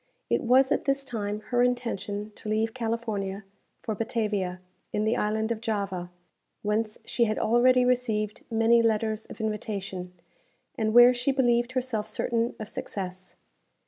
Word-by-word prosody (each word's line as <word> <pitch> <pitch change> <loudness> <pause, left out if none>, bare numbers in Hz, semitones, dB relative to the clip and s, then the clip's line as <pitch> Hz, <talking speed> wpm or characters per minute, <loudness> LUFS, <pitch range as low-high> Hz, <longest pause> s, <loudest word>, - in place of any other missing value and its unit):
It - - +3
was, 260 +3 +4
at - - +1
this 275 0 +1
time, 210 -4 -3
her 245 0 +3
intention 225 -4 -1
to 210 - -8
leave 220 +1 0
California 220 -4 -3 0.4
for 220 - -2
Batavia, 210 -4 -1 0.3
in 210 - 0
the 220 - +2
Island 220 +2 0
of 220 -1 -2
Java, 200 -5 -2 0.5
whence 215 +1 -1
she 235 - +1
had 215 -1 -1
already 250 +2 +4
received 220 -4 0
many 230 +1 +4
letters 220 -1 0
of - - -11
invitation, 200 -4 -3 0.6
and 220 0 0
where 240 +1 +9
she 250 +3 0
believed 240 -2 +2
herself 245 -5 -1
certain 230 +2 -1
of 215 - -5
success. 185 -3 -6
220 Hz, 145 wpm, -27 LUFS, 210-240 Hz, 0.6 s, where